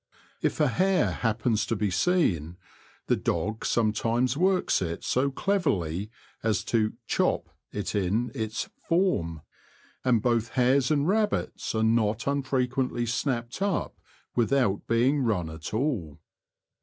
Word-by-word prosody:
If - - 0
a 150 - +4
hare 185 +6 +2
happens 115 -1 0
to 115 - 0
be 105 -1 0
seen, 90 - +1 0.5
the - - +2
dog 110 +2 -2
some 110 -2 +2
times 120 +3 +1
works 185 - +2
it 85 -2 -3
so 135 +2 +1
cleverly 110 - 0 0.3
as 110 -2 0
to 110 -2 +2
"chop" - - 0 0.2
it 105 -2 -3
in 105 +4 0
its 110 -4 -3 0.2
''form"; 85 - +1 0.6
and 125 -3 +3
both 115 -2 +1
hares 130 +1 +3
and 150 -1 +2
rabbits 210 - 0
are 110 - +1
not 110 0 +2
unfrequently 130 -3 0
snapped 120 +3 -2
up 200 -2 -1 0.4
without 120 -4 +1
being 125 +5 +3
run 95 -10 0
at 80 +1 -7
all. 110 - -1
120 Hz, 130 wpm, -27 LUFS, 105-140 Hz, 0.6 s, a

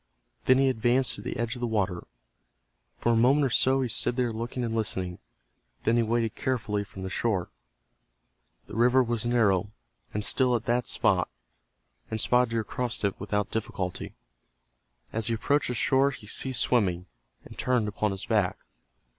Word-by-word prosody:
Then 130 - +6
he 135 0 +4
advanced 125 +1 +2
to - - -6
the 125 - -4
edge 115 0 -1
of - - -8
the 120 - -1
water. 100 -5 -1 0.9
For 120 - +1
a - - +3
moment 135 +5 +4
or 130 - 0
so 130 +2 +3
he - - 0
stood 120 +1 -1
there 125 -2 0
looking 120 +3 -4
and 115 -1 -2
listening. 95 -5 -2 0.6
Then 115 - +3
he 120 - +4
waded 115 -1 0
carefully 110 -5 -1
from 100 -2 -10
the 95 - -3
shore. 100 -7 -1 1.1
The - - -13
river 125 +3 +4
was 120 -1 -1
narrow 105 -5 +2 0.4
and 105 0 -2
still 125 +1 +3
at 115 - -2
that 120 +1 +1
spot, - - +1 0.8
and 110 - -2
Spotted 125 +2 +3
Deer 115 -1 -1
crossed 120 +1 -3
it 100 - -1
without 105 0 -2
difficulty. 95 -5 -4 1.0
As 115 0 0
he 115 - +1
approached 145 +6 +1
the 125 - -2
shore 135 +3 +3
he 125 -5 -9
ceased 125 +3 0
swimming, 90 -8 +1 0.4
and - - -12
turned 125 -4 +1
upon 105 +1 -1
his 95 0 -5
back. 105 -5 +1
115 Hz, 175 wpm, -27 LUFS, 105-125 Hz, 1.1 s, Then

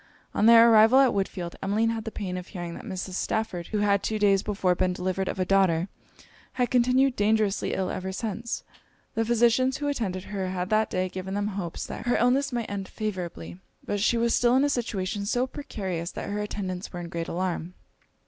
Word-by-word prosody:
On 210 - +3
their 230 0 +9
arrival 220 +3 +7
at 270 -2 +6
Woodfield, 190 -3 -2
Emmeline 215 +4 +1
had 225 -1 -4
the 225 - -4
pain 185 -4 -4
of 180 0 -6
hearing 175 -3 -6
that - - -9
Mrs. 190 -3 -5
Stafford, 185 -3 -2
who 215 - -2
had 200 -1 +2
two 220 - -1
days 200 -2 +3
before 195 -3 +1
been 180 +1 0
delivered 185 +1 -2
of - - -3
a 185 - +1
daughter, 185 -2 +2 0.6
had 250 -1 0
continued 255 +1 +3
dangerously 210 -1 +1
ill 190 -1 -1
ever 190 0 -4
since. 225 +3 -4 0.5
The 225 - +1
physicians 240 +3 +3
who 290 - -3
attended 200 -10 -2
her 190 -2 -4
had 185 +1 -3
that 215 0 +3
day 185 0 -1
given 185 +1 -5
them 205 0 -1
hopes 190 -4 -4
that - - -7
her 245 - +3
illness 265 +4 +2
might 235 -2 -2
end 195 -2 -4
favourably; 175 - -5 0.3
but 205 - -2
she 235 +3 +2
was 235 0 +2
still 245 0 +3
in 265 - +4
a 290 - +2
situation 205 -6 -2
so 245 +3 +1
precarious 190 - -5
that - - -5
her 205 - -2
attendants 195 -3 -4
were 175 - -6
in 175 - -6
great 170 0 -4
alarm. 180 0 -3
200 Hz, 205 wpm, -26 LUFS, 185-230 Hz, 0.6 s, their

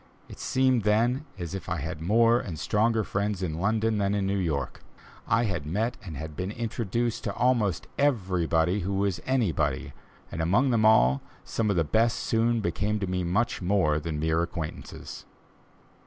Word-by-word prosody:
It - - -12
seemed 130 -2 +2
then 120 +7 +2
as 85 0 -5
if 95 -1 -6
I 90 - -1
had 80 +1 -5
more 115 +6 +4
and 85 -9 -6
stronger 110 +5 +1
friends 100 -1 -2
in 80 -2 -3
London 110 +2 +1
than 100 0 +1
in 100 -1 0
New 100 +1 0
York. 75 -6 -2 0.5
I 115 +1 +3
had 100 -9 -2
met 110 +9 -1
and 85 -7 -7
had 80 +1 -7
been 90 +4 -3
introduced 115 +1 -2
to - - -2
"almost 115 -8 +1
everybody 90 - +1
who 100 +1 -2
was 95 -3 0
anybody," 85 - 0 0.4
and 80 - -3
among 115 +11 +3
them 110 -2 +3
all, 65 - +5 0.2
some 110 -2 -1
of 100 - +1
the 85 - +3
best 115 +8 +2
soon 115 0 +1
became 105 +4 -1
to 100 - -1
me 90 0 -2
much 100 +8 0
more 90 -5 +2
than 75 -1 -4
mere 80 +1 +1
acquaintances. 85 -2 -6
100 Hz, 175 wpm, -27 LUFS, 85-115 Hz, 0.5 s, all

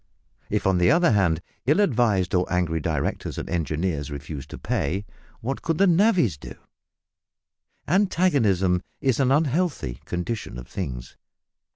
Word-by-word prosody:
If, - - -1
on 95 -2 +3
the 90 - +4
other 170 -2 +4
hand, 90 -5 +2 0.2
ill 150 +8 +4
advised 115 - +2
or 90 -1 +1
angry 85 -3 +1
directors 75 -2 -2
and - - -4
engineers 80 -2 -2
refused 70 -1 -7
to - - -8
pay, 95 +8 -2 0.4
what 130 +4 -3
could 165 -2 -1
navvies 175 - +3
do? - - -10 1.3
Antagonism 140 - +2 0.2
is 130 -3 +1
an 130 -1 +3
unhealthy 145 - 0
condition 90 - -4
of 60 0 -9
things. - - -6
95 Hz, 135 wpm, -24 LUFS, -, 1.3 s, the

